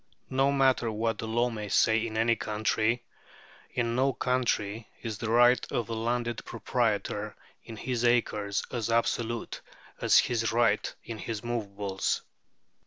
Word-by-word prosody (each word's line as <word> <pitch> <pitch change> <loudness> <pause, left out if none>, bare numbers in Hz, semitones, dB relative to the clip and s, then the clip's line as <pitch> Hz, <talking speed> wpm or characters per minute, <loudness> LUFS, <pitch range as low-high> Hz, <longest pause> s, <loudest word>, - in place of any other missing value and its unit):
No 135 +1 +3
matter 130 -4 +3
what 110 0 -1
the 110 - -4
law 120 +2 +1
may 105 -2 -5
say 110 +3 +3
in 110 -1 -5
any 115 +1 +3
country, 110 +2 0 0.7
in 115 -1 -1
no 135 +2 +2
country 115 -5 -1
is 110 -3 -4
the 115 - -3
right 120 +2 +5
of 120 - 0
the 115 - -4
landed 120 +1 -1
proprietor 110 -2 -1 0.3
in 115 - -9
his 120 +1 -2
acres 105 -4 +1
as 120 -3 -2
absolute 115 0 -1 0.4
as - - +5
his 115 -2 +2
right 115 -2 +2
in 115 -2 -7
his 110 0 -4
movables. 100 -5 -2
115 Hz, 145 wpm, -29 LUFS, 110-120 Hz, 0.7 s, right